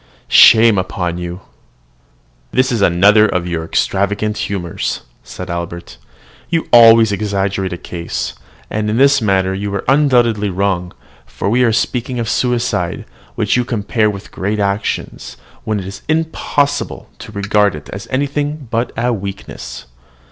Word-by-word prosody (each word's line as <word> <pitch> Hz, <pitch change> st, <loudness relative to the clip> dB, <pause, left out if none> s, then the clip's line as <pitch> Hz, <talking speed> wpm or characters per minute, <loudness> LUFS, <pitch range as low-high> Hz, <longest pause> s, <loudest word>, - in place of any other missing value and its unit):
Shame 110 Hz, -3 st, +7 dB
upon 90 Hz, -2 st, -3 dB
you, 90 Hz, -, -4 dB
ye -, -, -8 dB
sages!" 95 Hz, -, -20 dB, 1.1 s
"This 130 Hz, +2 st, +2 dB
is 115 Hz, -4 st, 0 dB
another 100 Hz, +4 st, +5 dB
of 90 Hz, -4 st, -1 dB
your 85 Hz, -2 st, -3 dB
extravagant 100 Hz, +5 st, -1 dB
humours," 90 Hz, -6 st, -3 dB, 0.2 s
said -, -, -8 dB
Albert: 85 Hz, 0 st, -6 dB, 0.5 s
"you 165 Hz, -2 st, -1 dB
always 115 Hz, -2 st, +7 dB
exaggerate 100 Hz, -2 st, -1 dB
a 90 Hz, -, -4 dB
case, 85 Hz, 0 st, -5 dB, 0.4 s
and 105 Hz, 0 st, -1 dB
in 110 Hz, -, 0 dB
this 140 Hz, 0 st, +4 dB
matter 95 Hz, -3 st, +1 dB
you 100 Hz, +1 st, -3 dB
are 100 Hz, -, -4 dB
undoubtedly 120 Hz, -7 st, +3 dB
wrong; 90 Hz, -2 st, -1 dB, 0.4 s
for 100 Hz, -, -3 dB
we 125 Hz, +2 st, +3 dB
were 115 Hz, -, +3 dB
speaking 125 Hz, +2 st, -1 dB
of 115 Hz, -1 st, -2 dB
suicide, 125 Hz, -2 st, -1 dB, 0.3 s
which -, -, +1 dB
you 125 Hz, -, +2 dB
compare 110 Hz, -2 st, 0 dB
with 100 Hz, -2 st, -8 dB
great 105 Hz, +3 st, -2 dB
actions, 100 Hz, +1 st, -3 dB, 0.3 s
when 110 Hz, -1 st, -1 dB
it 95 Hz, -, -7 dB
is 95 Hz, +1 st, -8 dB
impossible 145 Hz, -3 st, -1 dB
to -, -, -10 dB
regard 100 Hz, -2 st, +1 dB
it 75 Hz, -, -10 dB
as 100 Hz, +4 st, -7 dB
anything 145 Hz, +1 st, -2 dB
but 115 Hz, +2 st, -1 dB
a 120 Hz, +1 st, +1 dB
weakness. 100 Hz, -1 st, -7 dB
105 Hz, 150 wpm, -16 LUFS, 95-120 Hz, 1.1 s, Shame